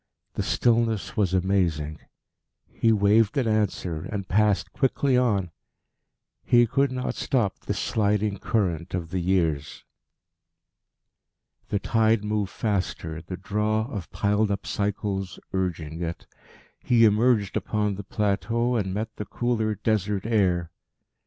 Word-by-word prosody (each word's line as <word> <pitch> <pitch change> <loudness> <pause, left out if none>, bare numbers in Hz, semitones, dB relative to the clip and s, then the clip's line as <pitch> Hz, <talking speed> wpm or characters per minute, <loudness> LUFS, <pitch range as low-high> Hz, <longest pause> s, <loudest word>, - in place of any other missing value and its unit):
The - - -2
stillness 115 -3 +1
was 100 -4 +1
amazing. 85 -5 0 0.7
He 115 - +2
waved 105 +4 +3
an 130 -4 +1
answer, 105 -6 0
and 100 -3 -4
passed 105 0 +2
quickly 135 0 +1
on. 105 -8 +1 0.9
He 120 -1 +5
could 135 +4 +1
not 125 0 -2
stop 115 -8 0
this - - -4
sliding 105 -1 0
current 90 -6 -1
of 85 -2 -4
the 95 - -1
years. 85 -5 0 1.9
The 105 - +1
tide 110 +1 +2
moved 105 -2 -1
faster, 90 -7 -2
the 90 +2 -7
draw 105 +3 0
of 100 -6 -5
piled 105 +1 +1
up 100 - -2
cycles 100 -2 -2
urging 85 -4 -2
it. 85 0 -4 0.6
He 115 -2 +5
emerged 110 -1 +3
upon 105 -1 0
the 100 +1 -6
plateau, 115 +5 0
and 95 -3 -2
met 110 +1 -4
the 105 - -4
cooler 110 -3 -1
Desert 105 -1 -1
air. 90 -7 +1
105 Hz, 125 wpm, -25 LUFS, 95-110 Hz, 1.9 s, He